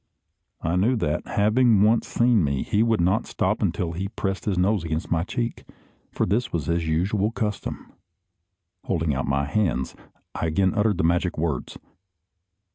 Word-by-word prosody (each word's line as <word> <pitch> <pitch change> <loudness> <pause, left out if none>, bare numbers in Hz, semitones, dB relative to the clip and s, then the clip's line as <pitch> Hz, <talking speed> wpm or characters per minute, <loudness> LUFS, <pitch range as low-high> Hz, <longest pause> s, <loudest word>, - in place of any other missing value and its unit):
I 85 +3 0
knew 115 +8 +3
that, 75 -10 -1
having 110 0 +3
once 110 +2 +3
seen 120 -5 +3
me, 70 -2 0
he 105 - +1
would 115 -1 +2
not 95 +7 +1
stop - - -1
until 85 -2 -1
he 90 +4 -4
had 100 - -8
pressed 95 -2 -2
his 100 -4 0
nose 95 0 +2
against 80 +1 -3
my 80 -1 +2
cheek, 115 +4 -3 0.5
for - - 0
this 120 +6 0
was 80 -5 -2
his 85 +1 -1
usual 95 +6 +1
custom. 110 -3 -4 0.9
Holding 80 -5 0
out 65 - -2
my 70 +1 +1
hands, 75 -6 0 0.4
I 85 - -2
again 95 +4 +1
uttered 105 -3 +1
the - - 0
magic 85 +1 +1
words. 80 -4 -2
95 Hz, 170 wpm, -24 LUFS, 80-110 Hz, 0.9 s, knew